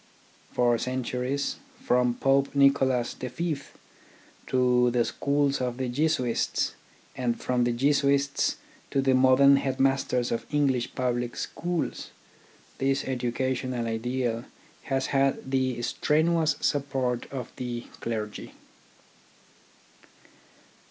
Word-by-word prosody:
For 120 -1 +2
centuries, 130 +2 -2 0.2
from 125 -1 +2
Pope 135 +1 +2
Nicholas 135 -3 +3
V 150 +5 -3 0.9
to 125 -1 +3
the 120 -1 +1
schools 140 -1 0
of 125 -1 -2
the 130 -1 -2
Jesuits, 130 -3 0 0.4
and 120 -2 -1
from 125 -1 +1
the 120 - +1
Jesuits 140 +2 +2 0.3
to 135 - 0
the 135 -1 +3
modern 130 +2 +6
headmasters 135 -2 0
of 115 - -2
English 135 -5 +1
public 120 -1 -1
schools, 175 -1 -3 0.7
this 135 +1 +1
educational 130 -1 -2
ideal 115 +1 -2 0.4
has 135 -1 0
had 135 -1 +1
the 130 -2 0
strenuous 160 +5 +2
support 135 -4 -1
of 130 -3 -5
the 120 -1 -4 0.2
clergy. 110 -2 -5
130 Hz, 100 wpm, -27 LUFS, 125-140 Hz, 0.9 s, modern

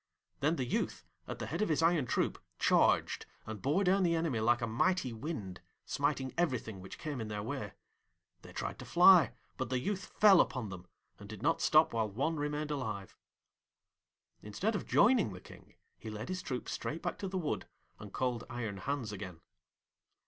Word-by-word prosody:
Then 150 +4 +2
the 130 - -2
youth, 120 - -2 0.2
at - - -5
the - - -4
head 170 +6 -3
of 215 - +1
his 160 +1 +2
iron 165 -6 +3
troop, - - 0 0.2
charged, - - +3 0.2
and 110 -3 -6
bore 150 +9 +2
down 195 +1 +3
the 170 -2 +3
enemy 160 -8 0
like 120 +2 +3
a - - +3
mighty 125 +4 +1
wind, 110 - -5 0.2
smiting 140 -2 -1
everything 125 - -1
which 95 +1 -9
came 145 -5 -4
in 110 - -4
their 105 -1 -4
way. - - -4 0.7
They - - -12
tried - - -4
to - - -8
fly, 180 -2 +7 0.3
but 130 -3 -3
the 130 - +1
youth 190 +10 -2
fell 200 -4 +6
upon 125 -5 -2
them, 90 -1 -9 0.3
and 100 - -11
did 110 - -8
not 165 +3 +2
stop 155 -3 +5
while 110 -2 0
one 140 +10 -1
remained 150 +1 -2
alive. 110 -9 -4 1.3
Instead 180 - -2
of - - -4
joining 225 - +4
the 90 - -8
King, - - -15 0.2
he 110 - -7
led 110 +2 -6
his 185 0 -3
troop 125 -7 -4
straight 160 - -4
back - - -3
to 195 - -3
the 190 0 -3
wood 165 -5 -2 0.3
and 105 -1 -9
called 125 -1 -1
Iron 115 -5 -4
Hans 130 +1 -3
again. 95 -5 -7
130 Hz, 190 wpm, -33 LUFS, 110-165 Hz, 1.3 s, fly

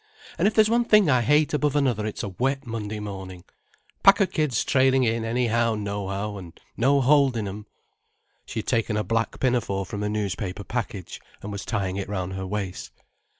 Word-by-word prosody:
And - - +4
if 215 - 0
there's 215 -1 +6
one 235 +2 +2
thing 210 -8 +5
I 125 -1 +4
hate 150 +6 +3
above 150 -1 +1
another 125 -7 +1
it's 110 - -5
a 100 - -3
wet 135 +8 -1
Monday 110 -2 -4
morning;—pack 95 - -1
of 200 - +2
kids 150 -7 0
trailing 130 -1 +3
in 115 -1 0
anyhow 115 0 +1
nohow, 100 0 -3
and 85 -3 -12 0.2
no 140 +4 +3
holding 135 -5 +3
'em——" 105 +2 -7 0.8
She 110 - -3
had - - -19
taken 115 -3 0
a 105 - 0
black 115 +1 -1
pinafore 115 -7 0
from 100 +3 -5
a 105 - -1
newspaper 100 -2 -3
package, 105 -5 -5 0.2
and 105 - -5
was 100 -1 -5
tying 100 -4 -2
it 100 -1 -4
round 95 -2 -3
her 95 0 -4
waist. 100 -2 -4
110 Hz, 185 wpm, -25 LUFS, 100-130 Hz, 0.8 s, there's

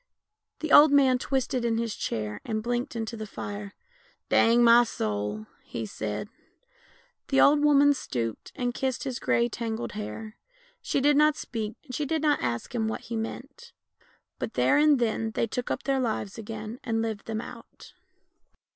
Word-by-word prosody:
The 315 -2 -3
old 295 0 +9
man 265 -3 +5
twisted 260 -1 -1
in 230 -1 +1
his 230 -2 -2
chair, 105 -1 -4
and 215 -1 -3
blinked 240 +1 -2
into 230 0 -4
the 215 -1 -6
fire. 205 0 -7 0.3
" - - -35
Dang 235 +1 +5
my 235 +1 +7
soul! 105 - -3 0.2
"he 115 - -6
said. 105 - -4 1.0
The 270 - +2
old 295 +1 +5
woman 285 -1 +6
stooped 115 - -4
and 245 -3 -2
kissed 260 0 -2
his 260 -4 -4
grey 235 - +2
tangled 230 0 -4
hair. 215 +1 -7 0.4
She 275 - 0
did 290 +1 +4
not 300 0 +5
speak, 225 -5 -5
and 265 -5 -11
she 295 +2 -2
did 315 +1 -1
not 295 -1 +2
ask 120 - -3
him 225 -2 0
what 220 - -3
he 235 - -6
meant; 275 - -6 0.7
but - - -4
there 295 - +4
and 300 -1 +5
then 225 -2 -1
they - - +1
took 245 +2 -4
up 265 - -2
their 275 -1 +1
lives 220 -5 -2
again 220 +1 -7
and 225 -2 -1
lived 220 -3 -4
them 220 -1 -2
out. - - -11
235 Hz, 175 wpm, -27 LUFS, 215-270 Hz, 1.0 s, old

